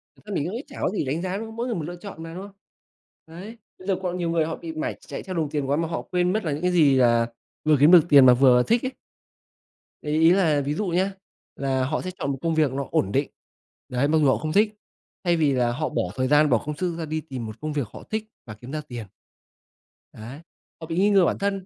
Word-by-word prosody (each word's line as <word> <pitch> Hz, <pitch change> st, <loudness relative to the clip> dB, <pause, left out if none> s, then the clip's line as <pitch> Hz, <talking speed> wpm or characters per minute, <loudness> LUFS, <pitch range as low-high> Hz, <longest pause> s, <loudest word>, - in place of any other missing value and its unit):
Thật -, -, -22 dB
ra 205 Hz, -, -6 dB
mình 150 Hz, -, 0 dB
cũng 185 Hz, +6 st, -4 dB
nghĩ 245 Hz, -, -5 dB
chả -, -, -12 dB
có -, -, +1 dB
gì 195 Hz, -6 st, -2 dB
đánh 150 Hz, +6 st, -2 dB
giá, 185 Hz, +1 st, -3 dB
đúng 220 Hz, -, -5 dB
không? 225 Hz, 0 st, -10 dB
Mỗi 235 Hz, +1 st, -2 dB
người 235 Hz, -, -2 dB
một 165 Hz, -, -3 dB
lựa 175 Hz, +3 st, -6 dB
chọn 175 Hz, -3 st, -9 dB
mà, 165 Hz, 0 st, -8 dB
đúng 185 Hz, +3 st, -7 dB
không? 200 Hz, -, -11 dB, 0.8 s
Đấy, 190 Hz, +8 st, -10 dB, 0.2 s
bây 185 Hz, -, -12 dB
giờ 195 Hz, -, +2 dB
còn 180 Hz, 0 st, -2 dB
nhiều 170 Hz, -1 st, -2 dB
người 165 Hz, -2 st, +1 dB
họ 165 Hz, -, -3 dB
bị 165 Hz, -1 st, -8 dB
mải 155 Hz, -, -3 dB
chạy -, -, -6 dB
theo 185 Hz, -1 st, -6 dB
đồng 160 Hz, -3 st, -1 dB
tiền 145 Hz, -2 st, -2 dB
quá 140 Hz, -, +2 dB
mà 165 Hz, 0 st, -1 dB
họ 165 Hz, -, -3 dB
quên 180 Hz, 0 st, 0 dB
mất 215 Hz, -, -1 dB
là 155 Hz, -, -1 dB
những 145 Hz, -, -3 dB
cái 180 Hz, 0 st, +1 dB
gì, 145 Hz, -7 st, +4 dB
à, 120 Hz, -2 st, +4 dB, 0.4 s
vừa 155 Hz, -1 st, +4 dB
kiếm 150 Hz, +4 st, +6 dB
được 180 Hz, -3 st, +9 dB
tiền 140 Hz, -3 st, +8 dB
mà 125 Hz, -, +8 dB
vừa 125 Hz, -1 st, +5 dB
thích 235 Hz, -, +1 dB
ấy. 260 Hz, -, -2 dB, 1.1 s
Thì 150 Hz, +1 st, 0 dB
ý 165 Hz, +1 st, +6 dB
là 165 Hz, -6 st, +3 dB
ví 140 Hz, +2 st, -2 dB
dụ 210 Hz, -, -2 dB
nhá, 185 Hz, +3 st, +1 dB, 0.4 s
là 135 Hz, -1 st, -1 dB
họ 155 Hz, +4 st, -2 dB
sẽ 185 Hz, -, -5 dB
chọn 140 Hz, -, -1 dB
một 135 Hz, -, -3 dB
công 165 Hz, -1 st, 0 dB
việc 155 Hz, -4 st, +2 dB
nó 140 Hz, +1 st, -3 dB
ổn 95 Hz, -, +1 dB
định. 135 Hz, +4 st, 0 dB, 0.6 s
Đấy, 125 Hz, +3 st, +1 dB
mặc 160 Hz, +2 st, +2 dB
dù -, -, +3 dB
họ 130 Hz, -, +3 dB
không 155 Hz, 0 st, -4 dB
thích, 210 Hz, +2 st, +3 dB, 0.5 s
thay 175 Hz, -2 st, +2 dB
vì 150 Hz, -3 st, +2 dB
là 125 Hz, -2 st, +1 dB
họ 155 Hz, +4 st, -2 dB
bỏ -, -, -1 dB
thời 130 Hz, 0 st, 0 dB
gian 150 Hz, +2 st, +4 dB
bỏ 120 Hz, -, +4 dB
công 150 Hz, 0 st, -4 dB
sức 175 Hz, -1 st, -2 dB
ra 165 Hz, -, -4 dB
đi 155 Hz, +1 st, -3 dB
tìm 130 Hz, -7 st, -7 dB
một 110 Hz, -1 st, -9 dB
công 155 Hz, 0 st, -3 dB
việc 140 Hz, -7 st, -2 dB
họ -, -, -10 dB
thích 220 Hz, 0 st, -2 dB, 0.2 s
và 105 Hz, -, -8 dB
kiếm 120 Hz, +5 st, -11 dB
ra 155 Hz, 0 st, -3 dB
tiền. 120 Hz, -4 st, -7 dB, 1.1 s
Đấy, 120 Hz, +7 st, -10 dB, 0.4 s
họ 160 Hz, -, -7 dB
bị 165 Hz, -, -4 dB
nghi 200 Hz, +3 st, +4 dB
ngờ 195 Hz, -3 st, +5 dB
bản -, -, 0 dB
thân. 195 Hz, -1 st, -2 dB
160 Hz, 285 wpm, -24 LUFS, 140-180 Hz, 1.1 s, được